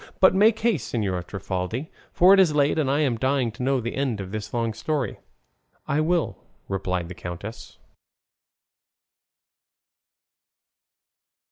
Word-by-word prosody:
But 190 - +6
make 215 +3 +4
haste, 235 0 0
Señora 95 -6 -1
Trifaldi; 95 - -4 0.2
for 185 +2 +6
it 195 - +6
is 170 -6 +4
late, 145 +2 +2
and 140 -4 +1
I 145 +3 +2
am 130 -6 +1
dying 130 -2 +1
to 110 - -10
know 135 +1 +1
the 120 0 -4
end 135 -6 -1
of 95 -1 -6
this 105 -1 -5
long 115 -2 -1
story." 130 +4 -2 0.7
"I 145 +2 +1
will," 170 +1 0 0.3
replied 90 -3 -2
the 90 - -7
countess. 90 +6 -8
125 Hz, 135 wpm, -24 LUFS, 100-150 Hz, 0.7 s, But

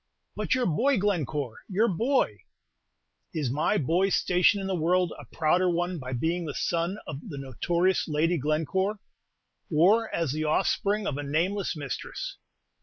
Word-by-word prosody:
"But - - 0
your 255 -1 +1
boy, 250 - +2
Glencore, 150 - -1
your 210 +4 +2
boy!" 225 - +1 1.0
"Is 145 -6 -1
my 155 +9 +1
boy's 180 +6 +2
station 180 +3 +3
in 195 - -4
the 190 - -1
world 175 +1 +1
a - - -10
prouder 175 +3 +2
one 175 0 -1
by 130 -1 -6
being 165 +7 -1
the 150 - -5
son 170 +3 -1
of 145 -3 -6
the 145 - -6
notorious 170 - 0
Lady 165 +2 +1
Glencore, 165 +8 0 0.7
or 200 +9 +4
as 165 -5 0
the 155 +2 -2
offspring 200 +6 +1
of 145 -1 -2
a - - -3
nameless 175 +7 0
mistress? 155 - -5
170 Hz, 155 wpm, -27 LUFS, 150-195 Hz, 1.0 s, or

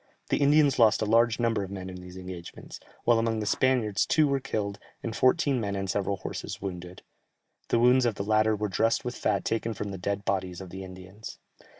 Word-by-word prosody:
The - - +2
Indians 145 -1 +4
lost 110 -2 +5
a - - 0
large 115 +2 +3
number 115 -3 +1
of 95 - -7
men 95 -1 -6
in 90 -1 -7
these 90 0 -11
engagements, 90 -2 -9 0.2
while 120 -1 +4
among 115 -1 0
the 105 - -3
Spaniards 115 -4 +1
two 155 -2 +4
were 140 -1 +1
killed, 105 -7 -3 0.2
and 115 -1 -4
fourteen 135 -1 +2
men 100 -2 -2
and 95 0 -3
several 100 +1 -1
horses - - -6
wounded; 90 -2 -7 0.6
the - - +2
wounds 125 +1 +5
of 115 - -1
the 100 - -3
latter 110 +1 +3
were 105 0 -2
dressed 115 +5 +1
with 125 - -2
fat - - -1
taken 115 0 -1
from 100 0 -4
the 95 - -6
dead 100 +2 -3
bodies 95 -2 -2
of 95 -2 -9
the 95 0 -7
Indians. 95 +3 -10
105 Hz, 215 wpm, -27 LUFS, 95-120 Hz, 0.6 s, lost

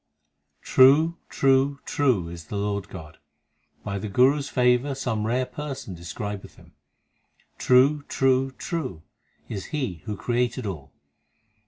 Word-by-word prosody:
True, 150 +6 +5
true, 135 +1 +2
true 125 - +1
is 85 -1 -9
the - - -7
Lord 100 -1 -2
God; 80 -4 -10 0.6
By 100 0 -3
the 105 - -5
Guru 130 +8 +4
s 145 +1 -5
favour 125 +2 +2
some 110 -5 -2
rare 125 +3 +1
person 135 -5 -6
describeth 90 +4 -7
Him. - - -19 0.9
True, 135 +4 +4
true, 135 0 +2
true 130 - -5 0.4
is 100 -4 -5
He 130 - -4
who 105 -2 -4
created 120 +2 -1
all. 80 -9 -6
125 Hz, 130 wpm, -25 LUFS, 100-135 Hz, 0.9 s, True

